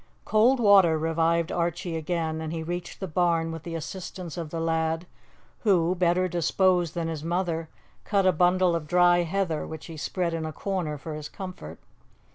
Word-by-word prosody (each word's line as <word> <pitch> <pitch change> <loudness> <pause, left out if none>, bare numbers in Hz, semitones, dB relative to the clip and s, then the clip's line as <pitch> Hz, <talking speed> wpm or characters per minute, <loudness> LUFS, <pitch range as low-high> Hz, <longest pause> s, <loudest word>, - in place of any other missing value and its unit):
Cold 235 +5 +4
water 195 -7 +6
revived 165 +1 +1
Archie 175 0 -2
again, 160 -1 -2
and 160 -1 -4
he 165 -1 -3
reached 175 +2 -5
the 190 - -4
barn 165 -1 +1
with 165 -1 -6
the 165 +1 -6
assistance 175 +1 -6
of 165 -3 -5
the 165 - -4
lad, 165 +1 0 0.5
who, 180 -5 +3
better 180 0 +2
disposed 175 0 +1
than 170 -1 -1
his 160 -2 -4
mother, 165 -1 -1 0.3
cut 200 -3 +1
a 185 - +6
bundle 180 +1 +3
of 160 -3 -3
dry 175 +1 +5
heather, 175 -2 -1
which 160 -1 -8
he 165 -2 -9
spread 170 +2 -2
in 165 -1 -2
a 155 - -3
corner 175 -4 -3
for 155 +3 -7
his 150 -1 -6
comfort. 180 - -8
170 Hz, 180 wpm, -26 LUFS, 160-180 Hz, 0.5 s, water